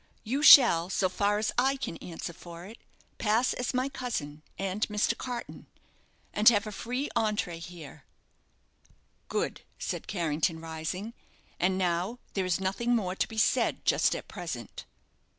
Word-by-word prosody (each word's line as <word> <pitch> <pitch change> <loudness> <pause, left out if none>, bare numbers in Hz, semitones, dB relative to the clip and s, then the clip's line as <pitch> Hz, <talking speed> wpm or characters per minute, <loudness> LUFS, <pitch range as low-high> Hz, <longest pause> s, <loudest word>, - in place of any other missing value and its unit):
"You 265 +6 -1
shall, 210 - +8
so 190 -1 +1
far 205 +2 +1
as 215 +1 0
I 265 +2 +3
can 170 -10 -5
answer 170 0 -7
for 170 0 -11
it, 220 +4 -12 0.4
pass 225 +3 +2
as 250 - -2
my 255 0 0
cousin 235 - -4 0.2
and 195 +1 -3
Mr. 210 0 +1
Carton, 245 -2 -7 0.7
and 210 +2 +7
have 210 -2 +2
a 215 - -5
free 250 +7 -3
entré 205 -6 0
here." 170 -3 -11 1.2
"Good," - - -2 0.2
said - - -4
Carrington, 165 -2 -1
rising. 165 +7 -5 0.5
"And 185 +2 +2
now 180 +5 0 0.2
there 190 -2 -1
is 180 -1 0
nothing 215 +6 0
more 190 -5 -1
to - - 0
be 225 - -10
said 220 - +2
just - - +3
at - - -7
present." - - -7
200 Hz, 150 wpm, -29 LUFS, 175-235 Hz, 1.2 s, shall